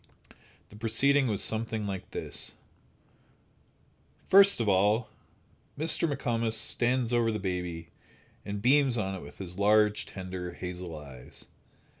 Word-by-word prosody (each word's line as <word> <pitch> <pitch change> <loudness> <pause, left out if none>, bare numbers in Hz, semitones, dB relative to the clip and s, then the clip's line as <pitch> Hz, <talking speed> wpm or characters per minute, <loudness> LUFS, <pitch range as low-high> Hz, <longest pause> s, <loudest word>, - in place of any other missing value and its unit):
The - - -15
proceeding 130 +5 +2
was 105 -3 +1
something 110 -1 -1
like 95 -2 -6
this: - - +1 1.8
First 200 -2 +6
of 115 - -1
all, 105 +4 +2 0.7
Mr. 160 +1 +2
McComas 115 -4 -1
stands 120 +2 +2
over 115 -1 +2
the 110 - -2
baby, 90 -4 -5 0.5
and 100 0 -6
beams 135 -1 +3
on 95 -3 -2
it 95 - -7
with - - -13
his 90 -1 -6
large, 105 +1 +2
tender, 90 -2 -7
hazel 90 -2 -7
eyes. 65 -4 -13
105 Hz, 125 wpm, -28 LUFS, 95-120 Hz, 1.8 s, First